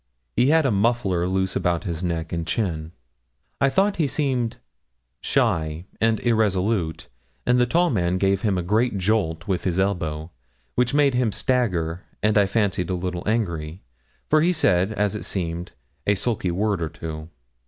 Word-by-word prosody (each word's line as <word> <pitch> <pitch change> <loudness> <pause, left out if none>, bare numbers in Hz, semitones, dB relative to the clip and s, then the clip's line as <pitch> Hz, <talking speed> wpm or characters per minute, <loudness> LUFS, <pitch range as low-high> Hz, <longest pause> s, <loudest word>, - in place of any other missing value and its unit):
He 120 +3 +3
had 160 +1 +4
a 135 - +3
muffler 100 -4 +1
loose 95 0 0
about 85 -1 0
his 85 -4 -4
neck 85 -2 -2
and 85 -1 -2
chin. 80 -5 -2 0.7
I 140 - +4
thought 195 +7 +2
he 160 -4 +2
seemed 130 -6 -1 0.6
shy 80 +2 0 0.2
and 110 -1 +3
irresolute, 100 -6 +1 0.4
and 125 0 +3
the 125 - +3
tall 170 +6 +2
man 90 -5 +1
gave 95 0 +1
him 100 -4 +1
a 90 - -1
great 105 +4 +1
jolt 90 -4 0
with 95 -4 -1
his 90 -2 -1
elbow, 80 -5 -1 0.4
which 125 +2 +1
made 145 -2 +4
him 125 -3 +1
stagger, 95 - 0 0.2
and 105 0 +3
I 100 -2 +5
fancied 100 -5 0
a 90 - 0
little 90 0 -3
angry, 85 -6 -2 0.4
for 155 0 +4
he 175 +3 +3
said, 100 - +2
as 105 -1 0
it 105 - -4
seemed, 85 -1 -3 0.3
a 100 - +4
sulky 105 -2 -1
word 100 +1 0
or 80 - -1
two. 80 0 -7
95 Hz, 170 wpm, -23 LUFS, 85-115 Hz, 0.7 s, I